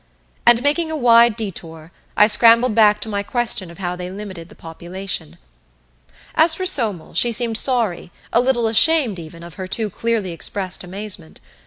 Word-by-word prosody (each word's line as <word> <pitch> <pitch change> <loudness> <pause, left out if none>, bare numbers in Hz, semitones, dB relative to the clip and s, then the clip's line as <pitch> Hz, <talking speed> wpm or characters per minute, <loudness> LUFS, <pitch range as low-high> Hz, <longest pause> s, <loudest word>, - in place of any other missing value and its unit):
And, 240 +1 +5
making 315 +3 0
a 315 - -4
wide 235 -3 +4
detour, 165 -7 -8 0.3
I 210 - +6
scrambled 230 +2 +4
back 210 -1 +3
to - - -4
my 200 -2 -3
question 215 -4 +1
of 170 - -14
how 180 -2 -4
they 180 0 -7
limited 190 -4 -9
the - - -16
population. 175 0 -7 1.0
As 320 +1 +4
for 370 - -4
Somel, 225 - +1
she 240 - +3
seemed 230 -1 0
sorry, 230 -10 -1 0.2
a 235 - +3
little 250 -2 0
ashamed 230 - +3
even, 165 +1 -12
of 170 -1 -12
her 185 - -5
too 215 +2 -2
clearly 225 -3 -3
expressed 185 +3 -2
amazement. 185 -2 -6
210 Hz, 170 wpm, -19 LUFS, 180-235 Hz, 1.0 s, I